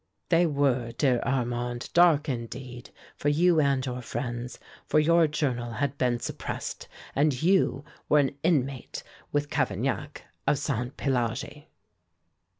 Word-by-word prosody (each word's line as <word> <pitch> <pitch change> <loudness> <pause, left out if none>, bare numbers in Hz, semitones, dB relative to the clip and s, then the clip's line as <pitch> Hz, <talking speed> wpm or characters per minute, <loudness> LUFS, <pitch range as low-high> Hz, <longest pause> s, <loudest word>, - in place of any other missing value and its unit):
"They 170 0 +4
were, 135 -5 +1
dear 130 -4 +2
Armand, 120 -2 -2
dark, 165 -4 +5
indeed, 125 0 -6 0.3
for 145 - 0
you 165 +3 +4
and 140 -2 +1
your 125 -1 -4
friends, 120 +1 -4 0.3
for - - +2
your 165 +2 +5
journal 125 -6 -2
had 140 +4 -1
been 125 -2 +1
suppressed, - - -5 0.3
and 145 -2 +2
you 180 -6 +2 0.2
were 150 - +5
an 140 -1 +2
inmate, 140 -6 -1 0.3
with 145 0 -1
Cavaignac, - - -1 0.2
of - - +4
Sainté 125 -2 -2
Pélagie." 130 +3 -2
135 Hz, 130 wpm, -27 LUFS, 125-150 Hz, 0.3 s, dark